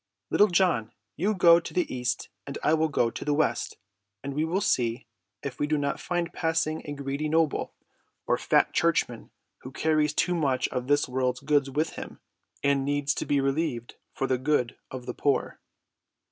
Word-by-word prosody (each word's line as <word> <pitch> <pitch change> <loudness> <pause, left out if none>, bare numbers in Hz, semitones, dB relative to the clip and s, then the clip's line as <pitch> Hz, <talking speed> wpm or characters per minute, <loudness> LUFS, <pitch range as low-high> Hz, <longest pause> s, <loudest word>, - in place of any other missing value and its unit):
Little 210 - +5
John, 175 - +1 0.2
you 205 +6 0
go 170 -2 +7
to 165 - -9
the 180 - +2
east 125 0 -2 0.2
and 140 - -5
I 155 - +3
will 160 0 +3
go 120 -6 +1
to - - -6
the 145 -1 +1
west, 145 -6 0 0.5
and 140 - -4
we 150 +3 0
will 170 +4 0
see 120 - 0 0.4
if 135 -3 -5
we 145 - +1
do 155 0 +1
not 140 -1 -1
find 175 -1 -2
passing 160 -1 0
a 145 - -4
greedy 140 +2 -3
noble, 160 -1 +1 0.5
or - - +2
fat - - +2
churchman - - 0 0.3
who 130 - -10
carries 155 +1 +1
too 180 - +2
much 140 -7 +1
of 125 -1 -3
this 145 +1 +3
world's 125 -1 -1
goods 145 -1 +2
with 150 +4 -1
him, - - -8 0.4
and 140 -1 +2
needs 145 0 0
to - - -4
be 145 - +2
relieved 135 -3 -1 0.2
for 135 - -2
the 130 -1 0
good 130 -3 +1
of 130 -1 -7
the 125 - -4
poor." 140 +2 0
145 Hz, 190 wpm, -27 LUFS, 130-160 Hz, 0.5 s, go